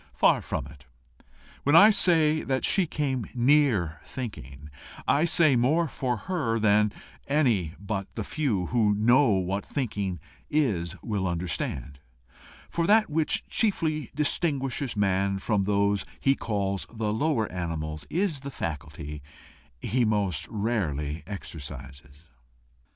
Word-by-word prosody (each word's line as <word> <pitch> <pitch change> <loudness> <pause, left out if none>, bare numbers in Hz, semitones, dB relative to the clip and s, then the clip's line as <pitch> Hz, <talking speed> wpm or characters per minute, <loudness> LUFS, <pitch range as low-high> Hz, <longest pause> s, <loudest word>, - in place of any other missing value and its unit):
Far - - +4
from - - -4
it. 70 -1 -14 0.8
When 145 +3 +3
I 205 +6 +9
say 160 -6 +3
that 130 -1 -1
she 190 -4 +2
came 135 -7 -2
near 120 - +2
thinking, 75 - -8 0.4
I 150 +4 +3
say 160 -5 +4
more 150 +8 +2
for 125 -4 -2
her 145 -12 0
than 105 -1 +3 0.4
any 115 - +1
but 100 -1 -3
the 110 - -3
few 115 - -1
who 105 -4 +3
know 120 +6 +4
what 95 +1 -1
thinking 100 - -3 0.3
is 95 - 0
will 100 -5 -1
understand, 80 -6 -3 0.7
for 170 0 -1
that 215 -4 +4
which 155 0 0
chiefly 160 -9 0
distinguishes 140 -5 0
man 100 -1 +1
from 100 0 0
those 100 0 +1 0.2
he 135 - +3
calls 100 -6 -2
the 110 -2 -2
lower 130 -1 +1
animals 80 -4 -4
is 175 -4 0
the 140 +1 -7
faculty 75 - -6 0.6
he 125 +3 +1
most 105 -6 0
rarely 85 -10 -2
exercises. 70 -5 -9
110 Hz, 125 wpm, -27 LUFS, 90-140 Hz, 0.8 s, I